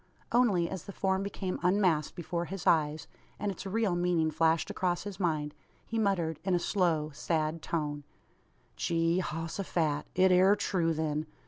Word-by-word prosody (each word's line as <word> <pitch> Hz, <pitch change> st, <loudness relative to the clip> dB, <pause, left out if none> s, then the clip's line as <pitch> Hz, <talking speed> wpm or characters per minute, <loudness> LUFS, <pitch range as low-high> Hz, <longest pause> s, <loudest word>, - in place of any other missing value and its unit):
Only, 210 Hz, -9 st, +3 dB
as 190 Hz, -2 st, -6 dB
the -, -, -7 dB
form 190 Hz, 0 st, 0 dB
became 195 Hz, -2 st, -3 dB
unmasked 180 Hz, -4 st, +2 dB
before 170 Hz, 0 st, -3 dB
his 190 Hz, 0 st, -6 dB
eyes, 155 Hz, -1 st, +2 dB, 0.3 s
and 205 Hz, -, -2 dB
its 195 Hz, +1 st, -7 dB
real 205 Hz, -2 st, +1 dB
meaning 175 Hz, -3 st, +1 dB
flashed 160 Hz, +1 st, +2 dB
across 175 Hz, -2 st, -1 dB
his 200 Hz, -2 st, -7 dB
mind, 155 Hz, -5 st, 0 dB, 0.3 s
he 225 Hz, -, -2 dB
muttered, 175 Hz, -7 st, 0 dB
in 190 Hz, -1 st, +1 dB
a -, -, +2 dB
slow, 165 Hz, -6 st, +1 dB
sad 155 Hz, +1 st, -1 dB
tone: 150 Hz, -3 st, -3 dB, 0.7 s
"Gee 165 Hz, +1 st, +1 dB
hos 165 Hz, 0 st, -4 dB
o -, -, 0 dB
phat! 155 Hz, -5 st, -1 dB
It 185 Hz, 0 st, +5 dB
air 185 Hz, +3 st, +6 dB
true, 175 Hz, -5 st, 0 dB
then! 155 Hz, 0 st, -1 dB
175 Hz, 165 wpm, -30 LUFS, 160-190 Hz, 0.7 s, air